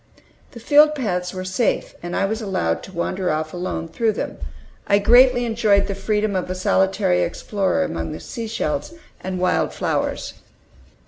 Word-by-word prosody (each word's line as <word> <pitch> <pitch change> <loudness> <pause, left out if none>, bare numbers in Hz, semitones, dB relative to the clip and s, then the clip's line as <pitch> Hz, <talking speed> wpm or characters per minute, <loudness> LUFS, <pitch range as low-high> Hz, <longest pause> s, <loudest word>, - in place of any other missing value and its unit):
The 235 - -9
field 300 +5 +5
paths 180 -9 -2
were 185 -1 -6
safe, 190 +5 0
and 175 0 -5
I 195 - +1
was 220 +3 -2
allowed 85 - -1
to - - -11
wander 185 +1 -2
off 155 0 -2
alone 175 -2 -4
through 220 +6 0
them. - - -5 0.5
I 200 - +4
greatly 245 +4 +5
enjoyed 220 -3 +2
the 200 - -3
freedom 210 +1 -1
of 180 -1 -2
a 185 - -2
solitary 190 0 +2
explorer 195 - -1
among 80 +1 -4
the - - -6
seashells 235 - -4 0.3
and 185 0 -3
wild 180 0 +1
flowers. - - -2
195 Hz, 165 wpm, -21 LUFS, 180-225 Hz, 0.5 s, field